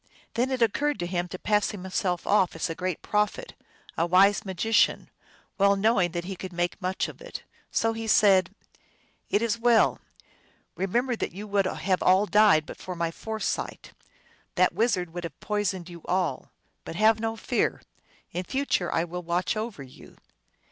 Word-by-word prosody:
Then 245 +3 0
it 260 -3 +1
occurred 290 +7 +1
to 175 - -3
him 175 0 -2
to 185 - -7
pass 210 +2 +1
himself 185 -2 -2
off 195 -4 +3
for 165 0 -3
a - - -4
great 185 -1 -3
prophet, 210 - -1 0.4
a 165 - +1
wise 195 +4 +5
magician, 200 +3 +1 0.5
well 200 0 +5
knowing 195 -3 +2
that 175 -1 -2
he 190 +2 -5
could 185 +1 -7
make 175 +3 -2
much 185 +1 -1
of - - -11
it. - - -8 0.3
So 225 0 +1
he 225 0 -5
said, 195 -3 +4 0.4
" - - -38
It 210 - +2
is 230 0 0
well. 235 -1 +4 0.8
Remember 240 +7 0
that - - -3
you 200 +3 -7
would 200 -2 +1
have 185 0 -1
all 190 +3 +4
died 210 -7 +5
but - - -9
for 185 - -7
my 170 -1 -1
foresight. 220 +5 -4 0.6
That - - +3
wizard 180 -7 0
would 175 0 -5
have 165 -4 -7
poisoned 200 -4 -2
you 170 -2 -10
all. 180 -1 -1 0.3
But - - -7
have 220 +3 +4
no 225 0 -2
fear. - - -1 0.5
In 180 - -3
future 260 -5 -1
I 165 - +1
will 175 +1 -5
watch 175 +3 -1
over 215 -9 -4
you." 130 - -15
195 Hz, 175 wpm, -27 LUFS, 175-220 Hz, 0.8 s, wise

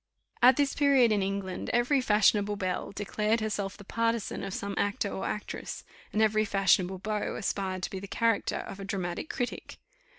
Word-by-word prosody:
At 250 +1 +7
this 285 -1 +2
period, 275 -5 +4
in 210 -2 +2
England, 195 -1 -3
every 245 +3 +3
fashionable 210 -2 +3
belle 185 -3 -2
declared 210 +2 0
herself 210 -3 -3
the 205 - -11
partisan 230 +1 -1
of 195 - -4
some 200 +1 -4
actor 205 0 0
or - - -3
actress; 210 - -5 0.3
and 215 - +2
every 215 0 +3
fashionable 195 -2 +2
beau 210 +2 -2
aspired 190 -3 -2
to 190 - -3
the 200 - -7
character 230 0 +1
of 195 - -7
a - - -6
dramatic 190 - -3
critic. 245 -1 -4
205 Hz, 170 wpm, -29 LUFS, 195-230 Hz, 0.3 s, At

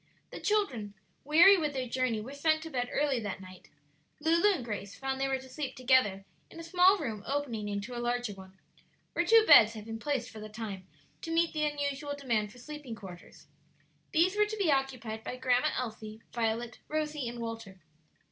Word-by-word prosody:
The - - -7
children, 255 - -1 0.3
weary 340 +7 +7
with 300 -3 -1
their 260 -2 -3
journey, 245 -3 0
were 255 +6 -8
sent 315 +2 +1
to 325 - -8
bed 245 -2 -2
early 285 -3 +1
that 205 -3 -5
night. 185 -1 -13 0.5
Lulu 335 +6 +4
and 285 -11 -3
Grace 205 -3 -5
found 270 0 -3
they 270 - +2
were 265 0 0
to 260 0 -12
sleep 265 0 -5
together 250 -7 +2 0.2
in 330 - -12
a - - -7
small 365 +3 +5
room 225 - -4
opening 245 -7 -2
into 205 +5 -4
a 240 - -3
larger 240 -2 -1
one, 190 0 -14 0.6
where - - +1
two 450 -1 +6
beds 225 - +8
had 215 -2 -9
been 225 0 -6
placed 270 -3 -2
for 220 - -10
the 215 0 -8
time 210 -4 -7 0.3
to - - -6
meet 330 +1 +2
the 305 -1 0
unusual 285 -1 -3
demand 230 -7 -1
for 250 - -16
sleeping 290 -2 -8
quarters. 185 -5 -12 0.7
These 350 +4 +3
were 420 0 +3
to 435 +1 -5
be 380 -7 +2
occupied 250 -5 -2
by - - -5
Grandma 250 -1 +2
Elsie, 220 -2 -6
Violet, 230 0 -2
Rosie, 300 -4 -2
and 240 - -8
Walter. 225 -5 -6
255 Hz, 195 wpm, -30 LUFS, 220-300 Hz, 0.7 s, beds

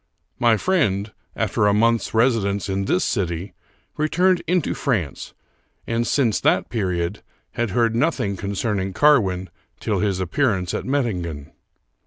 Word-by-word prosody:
My 120 -2 +4
friend, 110 - 0 0.2
after 105 - +1
a 100 - +3
month's 115 0 +2
residence 110 -4 +1
in 95 0 -1
this 90 - +1
city, 90 0 -2 0.4
returned 175 +4 +2
into 180 -2 +1
France, 95 - -2 0.5
and, 115 +1 -1
since 120 -7 +2
that - - +1
period, 90 -7 -2 0.3
had 120 -2 -2
heard 115 +3 +1
nothing 120 -7 0
con 100 +2 -4
cerning 100 -2 -2
Carwin 95 -11 +3 0.3
till - - -1
his 100 -3 0
appearance 95 - 0
at - - -3
Mettingen. 90 - -2
105 Hz, 135 wpm, -22 LUFS, 95-120 Hz, 0.5 s, My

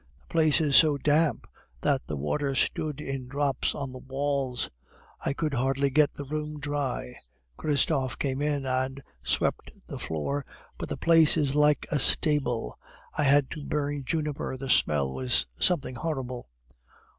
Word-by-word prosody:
The - - -29
place 160 -1 +4
is 145 -4 +2
so 155 -3 +6
damp 150 -1 +1 0.4
that - - 0
the 75 - -3
water 135 - -1
stood 150 +3 -1
in 135 -3 -5
drops 140 0 0
on 135 -2 -4
the 130 - -9
walls; 135 -1 -2 0.6
I - - 0
could 155 0 -2
hardly 135 +2 +1
get 150 +1 +3
the 145 - -6
room 150 +1 -4
dry. 145 -4 -3 0.4
Christophe 140 - +1
came 135 0 -2
in 145 -2 -1
and 130 +1 -2 0.2
swept 65 - -1 0.2
the - - -7
floor, 140 - -3 0.4
but - - -5
the - - -3
place 165 -1 +5
is 145 -3 +1
like 150 0 +3
a 150 - +2
stable; 135 - +2 0.3
I 150 - 0
had 140 0 +4
to 150 - -6
burn 145 -1 -2
juniper, 150 -2 -3
the 135 0 -2
smell 70 -8 +2
was 65 -1 +1
something 150 -7 +2
horrible. 130 - -4
140 Hz, 155 wpm, -27 LUFS, 130-150 Hz, 0.6 s, so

